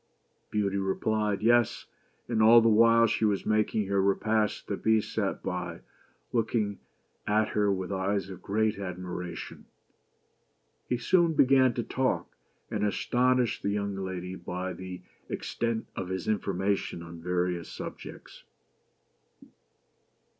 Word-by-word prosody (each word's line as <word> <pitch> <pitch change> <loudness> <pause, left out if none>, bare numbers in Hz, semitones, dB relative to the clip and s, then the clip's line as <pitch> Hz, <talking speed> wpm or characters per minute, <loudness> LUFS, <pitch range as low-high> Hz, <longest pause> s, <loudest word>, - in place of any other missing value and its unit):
Beauty 100 -2 0
replied 105 +1 0
"Yes," 120 0 +3 0.4
and 115 -2 0
all 115 +2 +8
the 115 - +3
while 115 +1 +6
she 115 0 0
was 105 -2 +1
making 110 0 +1
her 100 0 +1
repast 105 +2 +1
the 100 - -2
Beast 110 +1 +1
sat - - -1
by, 90 -2 -4 0.5
looking 110 -3 0 0.5
at 105 +1 +2
her 105 -1 +2
with 95 0 -3
eyes 95 +1 -1
of 95 - -9
great 110 +1 0
ad 90 -3 -5
miration. 90 -1 -6 1.2
He 125 - +1
soon 170 +6 +3
began 130 -3 +4
to 120 - -1
talk, 130 +2 -1 0.4
and - - -1
astonished 125 +3 +1
the 100 - -1
young 100 -1 -2
lady 95 -1 -4
by 90 +1 -4
the 90 0 -8 0.3
extent 115 -1 -2
of 90 -2 -4
his 95 -2 -4
information 100 -3 -1
on 85 0 -10
various 90 0 -1
subjects. - - -9
100 Hz, 130 wpm, -28 LUFS, 95-110 Hz, 1.2 s, all